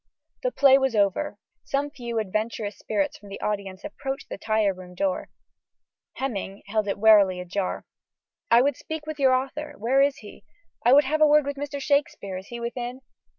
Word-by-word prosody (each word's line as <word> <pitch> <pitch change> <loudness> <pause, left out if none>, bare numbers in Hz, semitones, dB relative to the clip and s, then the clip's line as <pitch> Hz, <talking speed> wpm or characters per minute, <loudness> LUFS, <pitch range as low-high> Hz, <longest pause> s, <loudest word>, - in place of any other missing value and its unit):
The - - 0
play 275 - +6
was 265 -3 0
over. 200 0 +1 0.3
Some 285 +1 -1
few 235 -4 -5
adventurous 215 0 -2
spirits 205 -3 -1
from 205 - -14
the 195 - -7
audience 200 -2 -3
approached 275 -1 -5
the - - -5
tire 215 -2 +1
room 180 -1 -12
door: 285 +7 -1 0.8
Heminge 200 -6 -4
held 215 0 -1
it 200 - -1
warily 200 -4 +6
ajar. 185 +2 -3 0.6
"I 235 +2 +6
would 285 -1 +1
speak 315 -1 -6
with 310 -1 -6
your 260 -2 +5
author: 295 +3 -3
where 255 +5 +2
is 280 0 +2
he?" 210 - -13 0.4
"I 240 - +5
would 285 +2 +7
have 310 +3 -1
a 305 - +8
word 300 -1 +5
with 285 0 -3
Mr. 285 0 -5
Shakespeare: 280 -9 0
is 190 - -9
he 240 - -7
within?" 240 +2 -5
240 Hz, 185 wpm, -25 LUFS, 200-280 Hz, 0.8 s, a